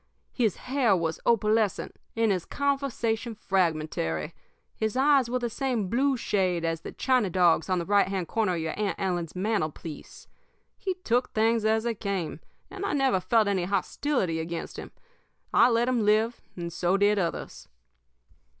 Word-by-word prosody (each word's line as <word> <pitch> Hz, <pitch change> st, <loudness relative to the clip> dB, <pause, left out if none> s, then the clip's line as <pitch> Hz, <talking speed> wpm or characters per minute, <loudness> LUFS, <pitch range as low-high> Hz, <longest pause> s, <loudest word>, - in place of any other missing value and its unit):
His 225 Hz, -7 st, +1 dB
hair 255 Hz, -6 st, +1 dB
was 165 Hz, -1 st, -2 dB
opalescent 215 Hz, -2 st, +1 dB, 0.2 s
and 225 Hz, -2 st, +3 dB
his 185 Hz, -3 st, 0 dB
conversation 255 Hz, -5 st, -1 dB
fragmentary. 155 Hz, -, -1 dB, 0.4 s
His 220 Hz, +2 st, -2 dB
eyes 270 Hz, -2 st, +4 dB
were 250 Hz, -, 0 dB
the 245 Hz, -1 st, -2 dB
same 235 Hz, -4 st, -2 dB
blue 270 Hz, +2 st, +2 dB
shade 185 Hz, -6 st, 0 dB
as 165 Hz, 0 st, -1 dB
the -, -, -7 dB
china 255 Hz, -6 st, +1 dB
dog's 175 Hz, -1 st, +3 dB
on 185 Hz, -, +2 dB
the 170 Hz, -, -2 dB
right 200 Hz, 0 st, +3 dB
hand 190 Hz, -3 st, -2 dB
corner 210 Hz, -3 st, 0 dB
of -, -, -2 dB
your 160 Hz, 0 st, -2 dB
Aunt 205 Hz, -4 st, 0 dB
Ellen's 175 Hz, -4 st, -2 dB
mantelpiece. 175 Hz, -6 st, -4 dB, 0.5 s
He 375 Hz, -1 st, -3 dB
took 245 Hz, +2 st, +1 dB
things 225 Hz, 0 st, +2 dB
as 220 Hz, 0 st, +2 dB
they 235 Hz, -1 st, 0 dB
came, 195 Hz, -6 st, -3 dB, 0.3 s
and 395 Hz, 0 st, -6 dB
I 400 Hz, -, -1 dB
never 270 Hz, -8 st, +2 dB
felt 215 Hz, +4 st, +2 dB
any 190 Hz, -3 st, 0 dB
hostility 195 Hz, -, -1 dB
against 165 Hz, +1 st, -5 dB
him. -, -, -8 dB, 0.6 s
I -, -, +6 dB
let 235 Hz, 0 st, +2 dB
him 250 Hz, -3 st, +1 dB
live, 220 Hz, +3 st, +2 dB, 0.2 s
and 170 Hz, -1 st, -5 dB
so 180 Hz, +2 st, +1 dB
did 205 Hz, +1 st, +3 dB
others. 170 Hz, -3 st, -4 dB
210 Hz, 165 wpm, -27 LUFS, 180-235 Hz, 0.6 s, I